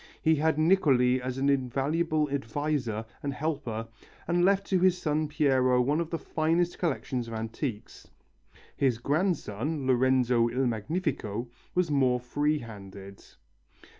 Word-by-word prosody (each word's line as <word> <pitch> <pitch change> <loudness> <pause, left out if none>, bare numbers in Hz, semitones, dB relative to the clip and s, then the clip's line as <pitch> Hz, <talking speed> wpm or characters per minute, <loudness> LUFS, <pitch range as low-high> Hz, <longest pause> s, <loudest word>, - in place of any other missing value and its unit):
He 160 - +3
had 160 +1 +1
Niccoli 140 -7 +3
as 130 0 -4
an 135 +1 0
invaluable 145 +4 +1
adviser 135 -4 -2 0.2
and 140 -1 -3
helper, 125 -8 -3 0.4
and 175 +1 +2
left 195 +1 +3
to 185 - +4
his 185 0 +3
son 155 -2 0
Piero 130 -4 +2
one 140 +5 +2
of 165 - -4
the 165 - -2
finest 165 +3 0
collections 130 -7 -2
of 115 - -6
antiques. 115 +1 -5 0.7
His 130 -4 +1
grandson, 145 - -1
Lorenzo 125 -2 +3
il 130 +3 0
Magnifico, 120 - -2 0.3
was 180 -3 +1
more 130 -3 +3
free 145 +5 0
handed. 100 -5 -10
140 Hz, 135 wpm, -28 LUFS, 120-155 Hz, 0.7 s, to